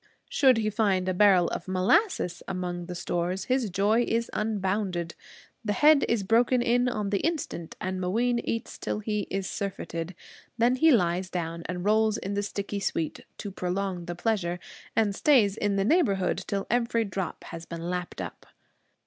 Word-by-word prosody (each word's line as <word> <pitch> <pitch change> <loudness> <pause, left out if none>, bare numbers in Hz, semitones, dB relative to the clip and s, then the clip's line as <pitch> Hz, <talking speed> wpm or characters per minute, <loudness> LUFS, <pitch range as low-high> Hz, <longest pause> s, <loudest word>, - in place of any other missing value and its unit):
Should 260 -4 +4
he 215 -1 0
find 195 -4 +1
a 185 - +1
barrel 185 -2 +5
of 170 - -5
molasses 185 - +2
among 175 -2 -4
the 180 - -5
stores, 175 +1 -2
his 255 -4 0
joy 205 +5 +2
is 230 +1 0
unbounded. 190 -5 -1 0.5
The 210 -2 0
head 300 +4 +5
is 230 -4 +1
broken 235 +5 +3
in 245 +1 +2
on 210 -4 -2
the 200 - +2
instant 295 - -3
and 185 0 -3
Mooween 235 +7 +1
eats 230 -1 -4
till - - -2
he 210 -1 -2
is 195 0 -2
surfeited. 180 -3 -4 0.4
Then 245 +2 +3
he 320 +5 +5
lies 185 - +2
down 170 -2 -3
and 180 +1 -4
rolls 215 +1 +3
in 195 - -4
the 200 - 0
sticky 200 0 -4
sweet, 165 -5 -2 0.2
to 205 - -6
prolong 185 -1 -3
the 175 0 -5
pleasure; 180 -3 -1 0.4
and 215 -2 +2
stays 220 -5 +4
in 205 -2 0
the 195 0 +1
neighborhood 205 - +2
till 200 -2 -2
every 235 -1 +1
drop 195 -2 -4
has 165 -1 -8
been 170 0 -5
lapped 180 0 -3
up. - - -8
200 Hz, 175 wpm, -27 LUFS, 180-225 Hz, 0.5 s, barrel